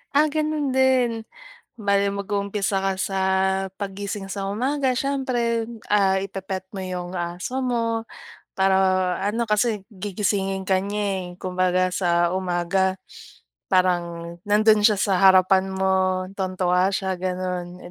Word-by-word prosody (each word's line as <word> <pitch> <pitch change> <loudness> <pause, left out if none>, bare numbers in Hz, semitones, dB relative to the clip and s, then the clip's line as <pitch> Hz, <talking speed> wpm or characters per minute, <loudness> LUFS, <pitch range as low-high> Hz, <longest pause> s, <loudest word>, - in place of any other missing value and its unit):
Ah, 300 +2 +5
gano'n 305 -2 -1
din. 260 -2 +3 0.7
Bale, 200 -1 +1
mag-uumpisa 200 0 -1
ka 195 0 +1
sa 195 0 -2 0.6
paggising 200 0 -5
sa 195 0 -4
umaga 260 +4 0
siyempre 245 -4 -1 0.2
ah, 195 -2 +3
ipe-pet 190 -1 -5
mo 190 - -4
'yong 180 -1 -5
aso 175 +8 -4
mo 230 -2 -1 0.5
para 190 0 +3 0.5
ano 230 +3 0
kasi 210 -1 0
gigisingin 195 -1 -2
ka 190 0 +2
niya 195 -2 -3
eh. - - -15
Kumbaga 185 0 0
sa 175 -1 +1
umaga 185 +1 0 0.7
parang 170 -2 0
nandun 215 +1 +5
siya 215 - +4
sa 190 -1 +1
harapan 190 0 +5
mo 190 -1 +1
tuwang-tuwa 185 -1 +1
siya 190 0 -1
gano'n 180 -1 -4
195 Hz, 120 wpm, -23 LUFS, 185-210 Hz, 0.7 s, Ah